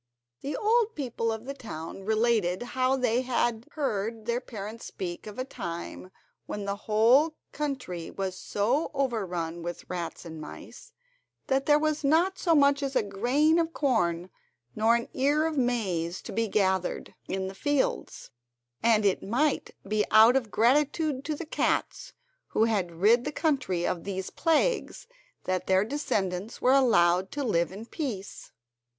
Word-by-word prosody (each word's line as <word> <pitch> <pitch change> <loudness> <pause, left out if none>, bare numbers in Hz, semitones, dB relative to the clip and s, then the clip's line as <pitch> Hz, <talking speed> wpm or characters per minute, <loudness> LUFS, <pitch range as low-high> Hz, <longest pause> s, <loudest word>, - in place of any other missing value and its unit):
The 285 - -3
old 455 +1 +2
people 240 -5 -2
of 220 +1 -5
the 275 - -4
town 195 - -8
related 220 -3 +1
how 260 +1 +2
they 250 -1 +1
had 240 -2 -1
heard 225 -6 -2
their 235 +1 0
parents 220 -1 -8
speak 175 +1 -6
of 210 - -9
a 255 - -2
time 185 -6 -6 0.4
when 205 -1 -4
the 200 0 -1
whole 235 +10 +3 0.2
country 260 - -4
was 190 -1 -4
so 235 - 0
overrun 180 -10 -2
with 175 +1 -6
rats 175 -1 -5
and 160 -2 -8
mice 475 - -11 0.5
that 270 0 0
there 295 0 +6
was 310 0 0
not 335 +7 +2
so 335 -3 +3
much 280 -1 +4
as 275 -1 -3
a - - +3
grain 250 +11 +2
of 330 0 -1
corn 180 - 0 0.4
nor 225 +2 +4
an 235 - -2
ear 290 +4 +2
of 320 -1 -1
maize 195 - -1
to - - -7
be 225 +2 0
gathered 190 -3 0
in 190 0 -2
the 190 - -6
fields; 290 +7 -1 0.5
and 220 -2 +3
it 195 - +2
might 270 +9 0 0.2
be 210 +1 +1
out 220 +3 +7
of 245 -5 0
gratitude 285 +5 +2
to 310 - -1
the 330 - -6
cats 315 - -1 0.3
who - - +1
had 205 -6 +1
rid 235 +4 +5
the 295 - -3
country 265 - 0
of 175 - -2
these 190 -1 -4
plagues 355 +10 0 0.4
that 185 -1 -2
their 190 +1 +3
descendants 205 -7 -2
were 255 - +4
allowed 190 -9 +4
to 285 - -3
live 170 -9 +1
in 205 +4 -8
peace. 235 - -6
230 Hz, 160 wpm, -28 LUFS, 190-275 Hz, 0.5 s, out